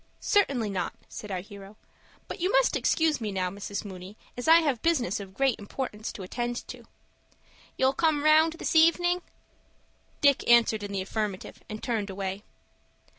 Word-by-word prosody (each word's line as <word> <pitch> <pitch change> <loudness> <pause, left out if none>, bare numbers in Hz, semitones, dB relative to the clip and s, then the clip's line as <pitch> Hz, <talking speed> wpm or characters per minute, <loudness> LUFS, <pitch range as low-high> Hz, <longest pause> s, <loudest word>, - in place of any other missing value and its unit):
"Certainly 260 - +1
not," 185 -3 -2 0.2
said 210 - -8
our 185 -2 -3
hero. 200 +1 -12 0.5
"But - - -7
you 365 +3 0
must - - +3
excuse 320 -5 +1
me 215 -2 -2
now, 185 -2 -1
Mrs. 200 +1 -6
Mooney, 190 +1 -9 0.2
as 245 - -5
I 325 - +8
have 280 -7 0
business 260 - +1
of 195 -1 -10
great 270 -2 +1
importance 215 0 -5
to 195 - -8
attend 240 +5 -4
to." - - -9 0.9
"You'll 265 +1 +3
come 300 -1 +1
round 315 +1 +5
this 335 0 -3
evening?" 350 +2 +4 1.0
Dick 280 -4 +3
answered 235 -2 +5
in 205 0 -6
the 195 -1 -2
affirmative, 205 -1 -4
and 215 0 -7
turned 220 -4 -2
away. 195 0 -4
225 Hz, 165 wpm, -27 LUFS, 200-305 Hz, 1.0 s, I